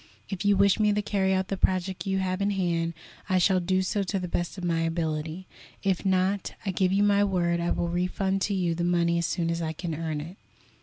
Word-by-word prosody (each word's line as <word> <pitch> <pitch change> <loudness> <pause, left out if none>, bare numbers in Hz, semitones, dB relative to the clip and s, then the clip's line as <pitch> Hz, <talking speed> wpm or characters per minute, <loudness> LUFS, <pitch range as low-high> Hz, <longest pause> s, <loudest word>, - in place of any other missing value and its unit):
If 195 -1 -4
you 200 -1 +4
wish 200 +1 +4
me 210 -1 +4
to 210 - +1
carry 195 -2 +1
out 190 0 0
the 195 - -2
project 185 +1 0
you 190 0 +1
have 185 0 -1
in 200 - +2
hand, 170 -4 0 0.3
I 185 - +3
shall 185 +1 +4
do 185 +1 +1
so 200 +2 0
to 195 +1 -1
the 180 -1 -3
best 175 +2 -2
of 185 - -7
my 170 -2 +1
ability; 165 +1 -2 0.4
if 195 -3 +1
not, 190 0 +1
I 195 - 0
give 185 0 +1
you 200 +1 +3
my 205 0 +4
word 175 -3 +1
I 170 0 -1
will 170 - 0
refund 185 +3 -1
to 200 - 0
you 175 -3 +1
the 170 +1 -2
money 170 -1 +2
as 170 - 0
soon 165 -1 -1
as 170 0 -2
I 160 -1 -2
can 165 +1 -4
earn 155 -1 -3
it." 165 +6 -8
185 Hz, 245 wpm, -27 LUFS, 170-195 Hz, 0.4 s, you